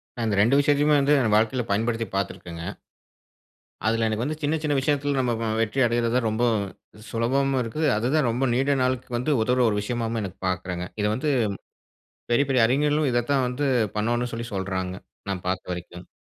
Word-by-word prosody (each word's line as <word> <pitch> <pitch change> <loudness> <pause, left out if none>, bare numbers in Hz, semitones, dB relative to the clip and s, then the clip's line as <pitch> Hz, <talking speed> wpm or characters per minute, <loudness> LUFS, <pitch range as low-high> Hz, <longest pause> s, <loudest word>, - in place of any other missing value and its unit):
நான் 120 -2 -2
இந்த 100 - 0
2 125 +6 +4
விஷயத்தையுமே 145 +1 +3
வந்து 140 +2 +3
என் 110 -3 +1
வாழ்க்கைல 115 +3 +2
பயன்படுத்தி 115 +1 0
பார்த்துருக்கேங்க. 85 -3 -4 1.2
அதுல 115 0 +2
எனக்கு 110 +2 -1
வந்து 155 +2 -3
சின்ன 150 +2 +1
சின்ன 150 -2 0
விஷயத்தில் 145 0 0
நம்ம 125 -2 +1 0.2
அ - - 0
வெற்றி 115 +4 0
அடைறதுதான் 120 0 +1
ரொம்ப 110 +3 -1 0.7
சுலபமாவும் 130 +3 +1
இருக்கு. 120 +7 -4 0.2
அதுதான் 125 +4 +1
ரொம்ப 125 +4 0
நீண்ட 135 +3 +2
நாளுக்கு 130 0 -1
வந்து 130 +5 -1
உதவுற 125 +3 +2
ஒரு 105 - 0
விஷயமாகவும் 115 +1 -2
எனக்கு 95 -4 -7
பார்க்குறாங்க. 90 -1 -3 0.2
இத 105 - +1
வந்து 150 +5 -1 1.0
பெரிய 140 +4 +4
பெரிய 125 -4 +4
அறிஞர்களும் 145 +2 +2
இத 120 -1 +1
தான் 135 -2 +3
வந்து 125 +4 -2 0.3
பண்ணணும்னு 120 +3 0
சொல்லி 115 0 -4
சொல்றாங்க, 95 -1 -3 0.3
நான் 95 -2 -3
பார்த்த 90 0 -2
வரைக்கும். 90 0 -9
120 Hz, 170 wpm, -25 LUFS, 110-135 Hz, 1.2 s, 2